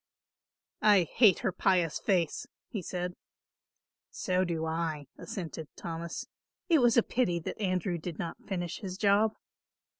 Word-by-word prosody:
"I 205 -4 +6
hate 200 - +4
her 215 - +1
pious 180 -4 +2
face," 175 -6 0 0.2
he 205 - -3
said. 180 0 -3 1.0
"So 185 0 0
do 165 -3 -1
I," 160 -2 -2
assented 165 -5 -6
Thomas. 170 0 -5 0.4
"It 325 -3 +6
was 240 -2 +4
a 235 - +7
pity 205 -9 +1
that 190 - -5
Andrew 185 -2 0
did 165 0 -6
not 170 - -4
finish 175 -4 -3
his 190 -3 -5
job." 210 +2 +3
180 Hz, 140 wpm, -30 LUFS, 170-200 Hz, 1.0 s, a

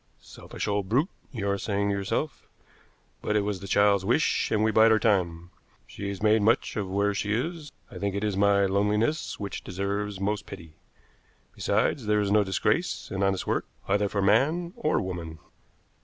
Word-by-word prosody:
Selfish - - -7
old 100 -2 -1
brute, 140 - +2 0.2
you 110 -7 -3
are 100 0 0
saying 100 0 -1
to 100 - 0
yourself. 100 +10 -3 0.7
But 105 - -1
it 105 - +3
was 100 -2 -2
the 100 - -8
child's 100 -1 +3
wish, 120 +10 +1
and 110 0 +1
we 110 - +3
bide 110 +1 +5
our 110 - +5
time. 90 -5 0 0.3
She 100 - -6
is 100 +1 -6
made 110 0 +4
much 110 +3 +2
of 100 -3 -3
where 100 +2 +1
she 105 +1 -2
is. 155 +3 -4 0.2
I - - -8
think 100 0 -2
it 100 - -2
is 105 -2 0
my 100 0 +3
loneliness 105 +9 0
which 100 -1 -5
deserves 100 +1 -3
most 105 +2 -2
pity. 85 -5 -10 0.8
Besides, 120 -7 0
there 105 0 +3
is 100 -1 0
no 105 0 +5
disgrace 95 -1 -1
in 95 - -3
honest 95 -1 +1
work, - - -1 0.2
either 100 +1 +1
for 100 -1 -1
man 155 - +2
or 155 - 0
woman." 85 -4 -5
100 Hz, 185 wpm, -27 LUFS, 100-110 Hz, 0.8 s, bide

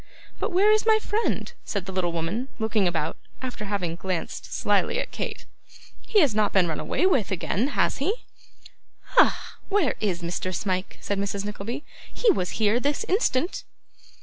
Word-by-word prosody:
But - - -1
where 395 +4 +5
is 430 +1 +3
my 440 -1 +6
friend?' 435 +1 -1
said 200 -4 -3
the 190 - -5
little 185 -2 0
woman, 170 +10 -2
looking 220 -4 +1
about, 165 -2 -1 0.2
after 250 -5 -5
having 190 -5 -2
glanced 185 -1 -4
slyly - - +2
at - - -3
Kate. - - -5 0.6
'He 425 - +3
has 285 -8 +4
not 210 -1 +2
been 185 -3 +4
run 160 - -2
away - - 0
with 270 - +3
again, 195 +5 0
has - - +2
he?' 395 - -1 0.9
'Ah! - - +3
where 390 - +3
is 185 -5 -1
Mr. 180 +2 -2
Smike?' 185 0 -2
said 200 -1 -1
Mrs. 200 0 -2
Nickleby; 215 +7 -5 0.3
'he 465 - +4
was 180 - -1
here 220 +1 +3
this 285 +3 0
instant. 360 - +1
210 Hz, 170 wpm, -26 LUFS, 185-290 Hz, 0.9 s, my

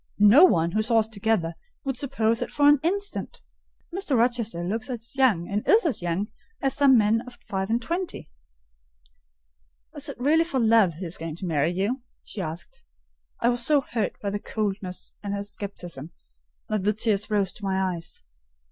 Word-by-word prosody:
No 210 - +8
one, 170 - +2
who 215 - +1
saw 225 +1 +2
us 220 -1 +3
together, 210 -6 0 0.3
would 270 -3 -2
suppose 230 -4 0
it - - -2
for 290 0 +3
an 290 -1 +7
instant. 400 +5 -2 0.5
Mr. 350 -8 0
Rochester 230 -7 +1
looks 220 +7 -2
as 235 0 -6
young, 225 -11 +3
and 205 +1 -1
is 440 -1 +5
as 295 - +1
young, 175 +4 -1 0.3
as 270 -1 0
some 275 -3 +5
men 220 +1 +3
at 250 - -10
five 190 0 -2
and 230 +1 +2
twenty." 345 +8 -4 1.7
"Is 295 0 -4
it 280 - -8
really 305 +6 +4
for 285 -6 -2
love 220 -7 +4
he 180 +4 -6
is 165 - -2
going 165 -1 -5
to 185 - -6
marry 155 -2 +1
you?" 200 +9 -1 0.2
she 205 - -6
asked. 160 0 -6 0.6
I 235 - +4
was 240 -1 0
so 290 +2 +4
hurt 230 -5 -3
by 200 - -2
her 205 - -2
coldness 200 -4 -4
and 205 -1 -3
scepticism, 175 -8 -6 0.6
that 215 -3 -1
the 210 +2 +2
tears 215 -1 0
rose 200 -3 +1
to 210 - -14
my 190 -1 0
eyes. 165 - -7
220 Hz, 185 wpm, -25 LUFS, 190-255 Hz, 1.7 s, No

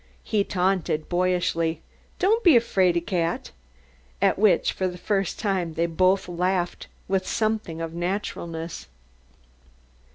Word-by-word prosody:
He 210 -3 +1
taunted 180 -5 0
boyishly, 175 -3 0 0.4
"Don't 440 +5 +2
be 330 -9 +7
a - - +7
'fraidy 185 -6 +2
cat,'" 170 -3 -1 0.7
at - - +2
which 200 -5 +4
for 185 - -1
the 180 -1 -6
first 195 0 -1
time 185 -6 -1
they 170 - +1
both 185 +3 +2
laughed 180 0 -1 0.2
with 190 -1 0
something 215 -7 -1
of 165 0 -4
naturalness. 170 -2 -4
180 Hz, 125 wpm, -25 LUFS, 170-195 Hz, 0.7 s, be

